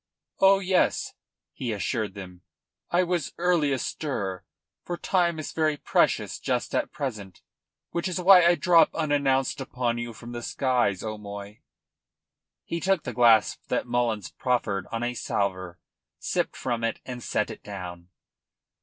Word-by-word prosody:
"Oh 195 0 +6
yes," 190 -1 +1 0.4
he 120 -3 -3
assured 105 0 -2
them, 90 -2 -9 0.5
"I 175 +1 +3
was 175 -4 -2
early 170 -4 +2
astir, 105 -8 -3 0.4
for 175 - -4
time 175 -3 +1
is 155 - -5
very 155 -2 +1
precious - - +1
just - - -2
at - - 0
present, 105 -9 -6 0.5
which 170 +2 -1
is 185 0 -2
why 180 0 +8
I 170 +1 +5
drop 170 -2 +4
unannounced 140 -3 +1
upon 125 -3 -2
you 120 0 -4
from 120 +2 -10
the 120 0 -5
skies, 120 -7 0
O'Moy." 105 -1 -7 1.0
He 170 - -3
took 190 -2 +1
the 125 - -5
glass 115 -2 +4
that - - -1
Mullins 120 -4 -1
proffered 110 -7 -1
on 115 0 -2
a 120 0 -1
salver, 95 -6 -2 0.4
sipped - - -1
from 120 -2 -2
it, 115 -1 -1
and 125 -1 -6
set - - -1
it - - -10
down. 90 -3 -8
125 Hz, 145 wpm, -26 LUFS, 105-160 Hz, 1.0 s, why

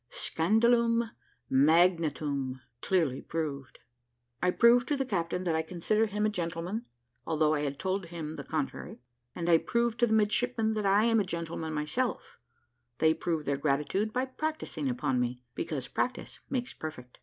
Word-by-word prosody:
`SCANDALUM 230 +5 +2 0.4
MAGNATUM' 145 -3 +2 0.2
CLEARLY 160 -9 +1
PROVED 145 -5 -4 0.6
I 180 - +3
PROVE 235 +5 +5
TO 290 - +1
THE 270 - 0
CAPTAIN 180 -5 -1
THAT 170 -3 0
I 160 - +2
CONSIDER 185 +7 0
HIM 210 +1 -1
A - - +3
GENTLEMAN, 175 +4 -3 0.4
ALTHOUGH 155 -1 +2
I 150 - +1
HAD 140 -1 -2
TOLD 190 +2 -2
HIM 160 -2 -6
THE - - -6
CONTRARY, 150 -6 -4 0.4
AND 170 -1 -3
I 165 -1 +6
PROVE 235 +3 0
TO 240 - +3
THE 220 - +1
MIDSHIPMEN 220 +1 +2
THAT 215 -1 -2
I 200 +2 +4
AM 225 -1 +4
A - - +2
GENTLEMAN 165 -3 -4
MYSELF 155 +13 -2 0.6
THEY 160 0 +4
PROVE 160 -1 -2
THEIR 140 0 0
GRATITUDE 150 +9 0
BY 255 +3 0
PRACTISING 265 - -3
UPON 130 +1 0
ME, 125 0 -2
BECAUSE 140 -5 -4
PRACTICE 250 0 -3
MAKES 260 -1 -2
PERFECT. 125 -6 -8
170 Hz, 160 wpm, -30 LUFS, 150-220 Hz, 0.6 s, I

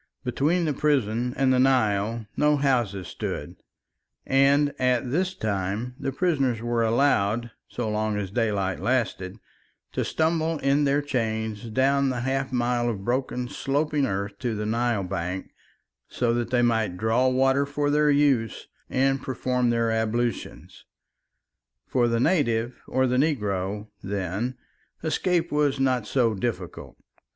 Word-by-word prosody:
Between 155 +8 +1
the 150 - 0
prison 125 -5 +1
and 130 -1 +3
the 125 - +3
Nile 115 -4 +2
no 150 0 +3
houses 120 -10 0
stood, - - -5 0.7
and 140 +2 +3
at 125 -1 +1
this 185 +5 0
time 105 - -2
the 135 - -2
prisoners 135 -7 +1
were 120 0 -1
allowed, 115 -2 +2 0.2
so 120 -2 -4
long 105 0 -1
as 100 -2 -4
daylight 100 -4 0
lasted, 115 -6 -1 0.5
to - - -1
stumble 160 0 0
in 140 +1 +2
their 140 +1 +2
chains 110 -4 -2
down 135 +3 +2
the 125 -2 -2
half 135 +1 -1
mile 120 -1 +1
of 100 -4 -4
broken 125 0 -1
sloping 145 +2 0
earth 100 0 -3
to 120 -3 -2
the 105 0 -3
Nile 115 -1 0
bank, 90 0 -4 0.6
so 120 -2 0
that 120 0 -1
they 120 -1 +2
might 110 -6 +1
draw 115 +5 +2
water 135 +2 +2
for 145 0 -1
their 150 0 +3
use 140 -7 +2 0.2
and 135 +1 +1
perform 125 -1 0
their 115 -1 +1
ablutions. 110 +2 -2 1.0
For 120 -2 +1
the 115 0 +1
native 120 -6 +1
or 130 0 +1
the 125 0 +1
negro, 105 - -1
then, 100 +6 -3 0.5
escape 170 +1 0
was 145 -2 +1
not 130 -3 +1
so 120 -4 +2
difficult. 95 -4 -5
125 Hz, 140 wpm, -25 LUFS, 110-135 Hz, 1.0 s, and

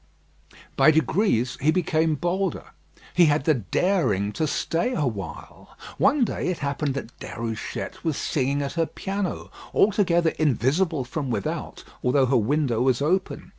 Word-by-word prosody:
By 135 +2 +6
degrees 155 - +1
he 145 - +2
became 160 -2 +2
bolder. 180 +4 -1 0.5
He 175 -1 +6
had 145 -1 +2
the 155 - +4
daring 115 - 0
to 155 - -1
stay 170 - -1
awhile. 100 - -5 0.2
One 275 -1 +4
day - - -3
it 180 -2 -1
happened 140 -1 -2
that 125 -3 -6
Déruchette 115 -2 -5
was 160 -3 -1
singing 140 0 0
at 140 - -4
her 165 -1 0
piano, 195 -1 -4 0.2
altogether 175 -5 +3
invisible 150 - +1
from 135 +2 -4
without, 105 -5 -4 0.2
although 130 +2 +3
her 130 +1 +1
window 120 0 +1
was 125 -2 +2
open. 180 +4 -1
150 Hz, 140 wpm, -24 LUFS, 130-175 Hz, 0.5 s, By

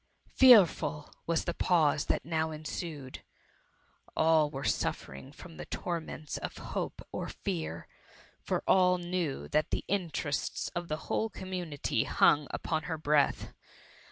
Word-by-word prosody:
Fearful 205 - +5
was 170 -1 +1
the 170 - -1
pause 155 -6 +2
that - - 0
now 160 0 0
ensued! 155 -3 -6 1.0
All 160 -2 +4
were 135 -1 -6
suffering 70 - -2
from 165 +2 -12
the - - -8
torments 160 -3 -4
of - - -6
hope - - -5
or - - -4
fear; 80 +1 -4 0.5
for - - -2
all 180 -1 +4
knew 175 -5 -3
that 155 +1 +1
the - - -2
interests 170 -6 -2
of 175 -1 -5
the 155 - -2
whole 225 - 0
community 180 - -2
hung 145 -1 +4
upon 160 -2 -2
her 160 -2 -3
breath. 150 -2 +1
160 Hz, 130 wpm, -31 LUFS, 150-175 Hz, 1.0 s, Fearful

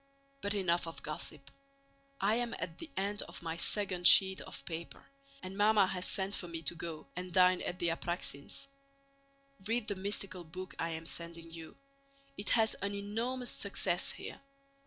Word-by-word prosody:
But 200 +1 -1
enough 175 -4 +2
of 165 - -7
gossip. 150 -2 -6 0.7
I 200 +2 +3
am 240 0 0
at 165 -1 -5
the 330 - -7
end 200 +2 0
of - - -8
my 165 -1 -2
second 185 -2 +4
sheet 190 -1 +8
of - - -9
paper, 170 0 -6 0.4
and 185 +1 -6
Mamma 205 0 +5
has 185 -1 -2
sent 195 0 0
for 175 - -3
me 165 -1 -5
to 155 - 0
go 165 -2 -6
and 180 +1 -4
dine 180 0 +6
at 180 - -3
the 175 -2 +1
Apráksins'. 165 - -3 1.0
Read 225 0 0
the 205 - -1
mystical 195 -1 -3
book 185 +3 -7
I 165 - 0
am 160 0 -4
sending 170 0 -6
you; 165 -1 -9 0.6
it 205 - -4
has 220 -2 +4
an 200 0 -1
enormous 230 +5 -2
success - - +2
here. - - -8
185 Hz, 170 wpm, -34 LUFS, 170-205 Hz, 1.0 s, sheet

